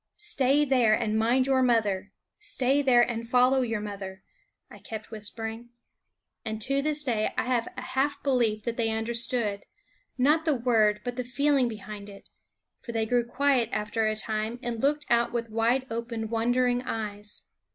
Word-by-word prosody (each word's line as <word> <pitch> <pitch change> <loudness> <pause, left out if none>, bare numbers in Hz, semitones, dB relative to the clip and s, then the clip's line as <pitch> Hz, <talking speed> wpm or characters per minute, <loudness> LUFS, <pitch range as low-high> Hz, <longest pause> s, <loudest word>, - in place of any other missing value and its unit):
" - - -48 0.2
Stay 275 +2 +3
there, 245 -6 +4
and 220 -2 -1
mind 235 +4 +3
your 265 -1 +2
mother; 225 -6 +1 0.3
stay 280 -9 +1
there, 250 -3 +5
and 230 -1 -4
follow 255 +2 +4
your 230 -3 -1
mother," 200 -2 -7 0.4
I - - -14
kept 220 0 -8
whispering. 225 +2 -4 0.7
And 220 -1 -4
to 275 +3 +1
this 300 +1 +1
day 230 -6 0
I - - +2
have 245 -2 0
a - - -4
half 270 +2 -1
belief 235 -6 +1
that 235 0 -3
they 230 -2 +1
under 225 +1 -2
stood, 235 -4 0 0.6
not 300 +5 +3
the 310 -3 +2
word 220 -4 +2
but 245 +1 -4
the 250 - -1
feeling 265 +1 +2
behind 210 -2 -8
it; 200 -1 -14 0.5
for 240 -3 -8
they 225 -1 0
grew 245 +2 +2
quiet 255 -1 +1
after 215 +1 -1
a 215 - 0
time 215 +1 -2
and 235 -2 -3
looked 295 +2 +1
out 235 0 +2
with 230 -2 -3
wide 235 +4 +1
open, 230 -1 -4
wondering 245 +2 +1
eyes. 210 -3 -5
235 Hz, 175 wpm, -27 LUFS, 220-255 Hz, 0.7 s, there